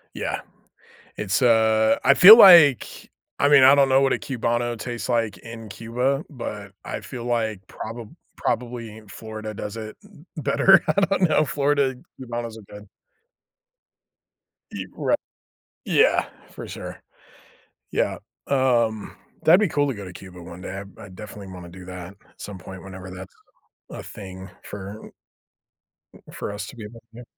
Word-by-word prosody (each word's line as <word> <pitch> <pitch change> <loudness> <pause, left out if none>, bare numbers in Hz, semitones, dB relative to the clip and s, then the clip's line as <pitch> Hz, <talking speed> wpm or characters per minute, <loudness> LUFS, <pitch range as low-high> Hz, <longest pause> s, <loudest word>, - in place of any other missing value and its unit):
Yeah, - - -3 0.8
it's, 100 +3 -1
uh, 110 -2 +3
I 140 - +6
feel 205 +9 +11
like 170 - +6 0.3
I 145 - +4
mean, 145 -2 +6
I 135 +2 +8
don't 140 -1 +4
know 135 0 +4
what 135 -1 +2
a - - 0
Cubano 120 -3 -2
tastes 120 +2 -6
like 115 -4 -1
in 115 -1 -10
Cuba, 125 - -2
but 105 - -7
I - - -5
feel 120 -2 -8
like 110 -5 -2
proba 115 0 -8 0.3
probably 115 -3 -4
Florida 110 +1 -8
does 105 +2 -6
it 110 -1 -8 0.4
better. 160 +5 +4
I - - +4
don't 195 -2 +2
know. 155 0 +3
Florida, 140 -1 0 0.3
Cubanos 120 -2 -5
are - - -12
good. 105 0 -12 1.8
Ye - - -6
right. - - 0 0.7
Yeah, 470 +3 +3 0.2
for - - -9
sure. - - -8 0.9
Yeah. - - -1 0.3
Um, 120 -5 0 0.3
that'd 175 +5 +6
be 210 - +2
cool 145 -3 0
to 135 - -2
go 100 -3 -8
to 90 - -10
Cuba 90 -1 -12
one 85 +1 -11
day, 95 +1 -6 0.2
I - - -10
I 100 - -11
definitely 100 +1 -10
wanna 90 -1 -10
do 90 +1 -12
that 90 -1 -8 0.2
at - - -20
some 100 -2 -7
point 95 +1 -11
whenever 95 -1 -10
that's 95 0 -10 0.6
a - - -8
thing 95 -2 -10
for 100 +1 -9 1.2
for 100 - -6
us 105 - -6
to - - -11
be 110 - -8
able 115 +2 -11
to 120 - -12
do. - - -11
115 Hz, 160 wpm, -23 LUFS, 100-135 Hz, 1.8 s, feel